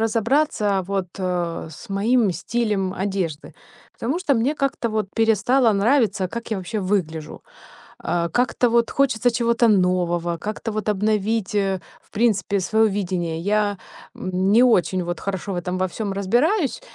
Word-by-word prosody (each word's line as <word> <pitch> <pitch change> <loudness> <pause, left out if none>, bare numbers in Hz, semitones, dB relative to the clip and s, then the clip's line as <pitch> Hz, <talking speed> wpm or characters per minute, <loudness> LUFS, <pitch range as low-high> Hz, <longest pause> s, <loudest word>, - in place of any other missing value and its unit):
разобраться 225 -2 +1
вот, 195 -1 -1
а, 175 -3 -2
с 195 +9 -12
моим 210 +1 +2
стилем 200 +1 -1
одежды, 185 -5 -3 0.4
потому 270 +9 -2
что 350 -7 +1
мне 260 +6 0
как-то 275 -4 -1
вот 215 -2 -1
перестало 225 +2 +3
нравиться, 215 -1 +2
как 235 +6 -7
я 215 - 0
вообще 190 +3 -4
выгляжу. 165 -5 -2 0.5
А, 170 -1 -1
как-то 245 +1 +1
вот 235 0 +2
хочется 250 -3 +2
чего-то 235 0 +2
нового, 175 -3 +1
как-то 215 +4 -4
вот 215 0 -3
обновить, 210 0 0
э, 195 -2 0 0.2
в - - -31
принципе 210 -2 +1
своё 220 +5 +2
видение. 180 -5 -2
Я, 205 +2 +1 0.4
м, 185 +1 -1
не 230 +3 +6
очень 185 -7 +3
вот 175 0 -4
хорошо 195 0 -4
в - - -3
этом 180 +1 -3
во 185 - +1
всём 200 +2 -4
разбираюсь. 255 - +1
205 Hz, 150 wpm, -22 LUFS, 185-230 Hz, 0.5 s, не